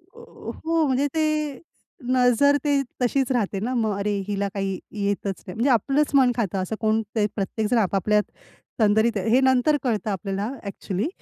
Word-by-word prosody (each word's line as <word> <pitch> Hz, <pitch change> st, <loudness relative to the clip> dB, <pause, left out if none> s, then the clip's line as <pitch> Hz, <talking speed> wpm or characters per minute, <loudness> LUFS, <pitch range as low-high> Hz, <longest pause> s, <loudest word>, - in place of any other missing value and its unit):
अ, -, -, -13 dB
अ, -, -, -9 dB
हो, 330 Hz, -1 st, +2 dB
म्हणजे 270 Hz, +2 st, +1 dB
ते 305 Hz, -3 st, 0 dB, 0.6 s
नजर 255 Hz, +3 st, +4 dB
ते 285 Hz, -2 st, +2 dB, 0.2 s
तशीच 265 Hz, +1 st, +1 dB
राहते 210 Hz, -5 st, 0 dB
ना 245 Hz, +5 st, -2 dB
मग, 215 Hz, -4 st, 0 dB
"अरे! 205 Hz, +1 st, -1 dB, 0.2 s
हिला 200 Hz, -1 st, -1 dB
काही 195 Hz, -2 st, -2 dB
येतच 200 Hz, -2 st, -3 dB
नाही" 180 Hz, -, -6 dB
म्हणजे 245 Hz, +5 st, +1 dB
आपलंच 275 Hz, +6 st, +1 dB
मन 255 Hz, -2 st, +5 dB
खातं. 195 Hz, -5 st, -1 dB
असं 200 Hz, +4 st, -3 dB
कोण 220 Hz, 0 st, +2 dB
ते 210 Hz, -1 st, +2 dB
प्रत्येकजण 220 Hz, +3 st, -1 dB
आपापल्यात 210 Hz, +1 st, +2 dB, 0.6 s
तंद्रीत 220 Hz, +1 st, +3 dB
आहे. 195 Hz, +3 st, -1 dB
हे 250 Hz, +3 st, +5 dB
नंतर 260 Hz, +3 st, +3 dB
कळतं 220 Hz, -3 st, -1 dB
आपल्याला 195 Hz, +3 st, -3 dB
ॲक्चुअली. 200 Hz, -, -3 dB
225 Hz, 170 wpm, -24 LUFS, 200-265 Hz, 0.6 s, मन